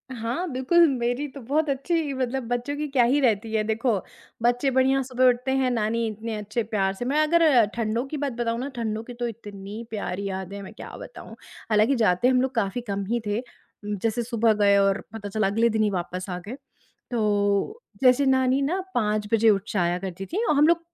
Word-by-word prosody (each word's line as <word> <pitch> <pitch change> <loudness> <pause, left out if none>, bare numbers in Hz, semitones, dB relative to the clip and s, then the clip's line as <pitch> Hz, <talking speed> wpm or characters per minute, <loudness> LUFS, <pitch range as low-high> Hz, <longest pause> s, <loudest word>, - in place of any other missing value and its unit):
हाँ, 235 +10 -3
बिल्कुल, 265 +7 +4
मेरी 250 +2 -1
तो 275 +1 -11
बहुत 295 +6 0
अच्छी 290 +2 -1
मतलब 260 0 -2
बच्चों 245 +4 -2
की 300 0 -2
क्या 265 -3 +3
ही 260 +5 +3
रहती 220 -3 +1
है। 215 - +2
देखो, 225 +2 0 0.5
बच्चे 245 +3 +2
बढ़िया 265 +1 +3
सुबह 255 0 +1
उठते 250 +2 0
हैं, 265 -1 +1
नानी 230 0 0
इतने 220 +1 -5
अच्छे 210 +2 -3
प्यार 195 -3 0
से 245 +5 -5
मैं 285 +4 +1
अगर 305 -8 +5
ठंडों 230 +2 -1
की 300 - -5
बात 280 -3 -2
बताऊँ 230 0 -2
ना, 270 - -3
ठंडों 220 -2 -3
की 245 - -9
तो 240 0 -3
इतनी 205 -1 -8
प्यारी 200 -2 -4
यादें 190 +1 -5
हैं, 200 - -7
मैं - - -10
क्या - - -9
बताऊँ। - - -10 0.3
हालाँकि 215 +5 +3
जाते 220 0 +3
हम 255 -1 +4
लोग 265 0 -1
काफ़ी 230 +2 -1
कम 200 0 -1
ही 235 +4 0
थे 205 +2 -1 0.4
उम, 210 0 -3
जैसे 230 +1 0
सुबह 230 -1 +2
गए 200 0 +5
और 195 0 +2
पता 205 -2 -6
चला 215 0 +1
अगले 225 +4 +2
दिन 220 -1 +1
ही 210 - +2
वापस 180 0 -4
आ 180 - -3
गए। 245 - -5 0.6
तो 210 - 0 0.2
जैसे 255 +2 +5
नानी 260 0 +3
ना, 320 +7 0 0.2
5 210 -2 0
बजे 225 0 +5
उठ 195 -2 +1
जाया 175 -3 +1
करती 190 0 -6
थीं 410 - -2
और 305 - +2
हम 295 +2 +5
लोग 340 0 +4
235 Hz, 215 wpm, -25 LUFS, 210-260 Hz, 0.6 s, अगर